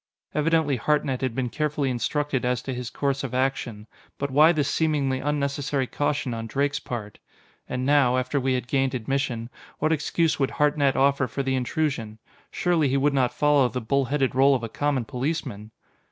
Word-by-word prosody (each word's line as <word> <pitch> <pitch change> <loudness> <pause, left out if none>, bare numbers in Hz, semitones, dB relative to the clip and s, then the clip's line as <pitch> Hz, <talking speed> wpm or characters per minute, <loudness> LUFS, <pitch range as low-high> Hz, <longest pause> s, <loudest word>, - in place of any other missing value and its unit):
Evidently 155 -2 +2
Hartnett 140 -2 0
had 130 -3 -2
been 125 -2 -2
carefully 150 -3 -1
instructed 140 +2 -1
as 125 -1 0
to 135 - -4
his 125 -1 -5
course 140 0 -1
of 130 -1 -4
action 125 -5 -1 0.3
but 140 -1 -3
why 155 +4 +6
this 150 -4 0
seemingly 145 -4 +1
unnecessary 140 -1 -1
caution 145 -1 -1
on 115 0 -5
Drake's 140 +4 0
part? 110 -4 -6 0.5
And 125 0 -2
now, 135 -3 +4
after 130 +3 0
we 130 0 +1
had 125 -1 -3
gained 135 0 +1
admission, 125 -1 -2 0.3
what 155 +1 +1
excuse 160 +1 0
would 135 - +2
Hartnett 145 -2 +2
offer 140 -1 +2
for 135 +4 -3
the 135 0 0
intrusion? 130 -4 -2 0.3
Surely 170 -5 +1
he 135 - +1
would 140 +1 +2
not 130 -3 +2
follow 145 -4 +3
the 125 - -3
bull 135 +4 +1
headed 135 0 0
rôle 135 +2 +4
of 120 - -3
a 115 - -4
common 145 -3 -1
policeman! 125 -5 -3
135 Hz, 180 wpm, -25 LUFS, 125-145 Hz, 0.5 s, why